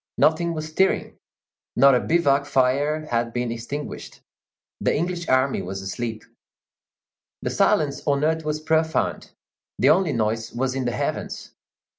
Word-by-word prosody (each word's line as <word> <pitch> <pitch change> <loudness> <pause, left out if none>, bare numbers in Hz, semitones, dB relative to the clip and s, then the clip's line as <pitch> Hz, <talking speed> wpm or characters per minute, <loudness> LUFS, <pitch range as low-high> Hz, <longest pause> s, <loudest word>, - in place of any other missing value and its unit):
Nothing 165 +2 +2
was 155 0 -5
stirring; 190 +5 0 0.6
not 135 +2 +6
a 125 - +4
bivouac 140 -4 +2
fire 145 +4 +1
had 115 -3 -1
been 120 -1 -2
extinguished; 120 +6 -6 0.6
the - - +1
English 175 +1 -3
army 130 +1 +2
was 95 +2 -6
asleep. 110 +2 -4 1.2
The - - -1
silence 145 -2 +2
on 140 0 +2
earth 160 +1 +1
was 150 0 -2
profound; 160 0 0 0.5
the - - +5
only 185 +1 +2
noise 110 0 -1
was 130 +1 -1
in 130 -1 -2
the 120 - 0
heavens. 105 - -4
140 Hz, 140 wpm, -23 LUFS, 120-155 Hz, 1.2 s, not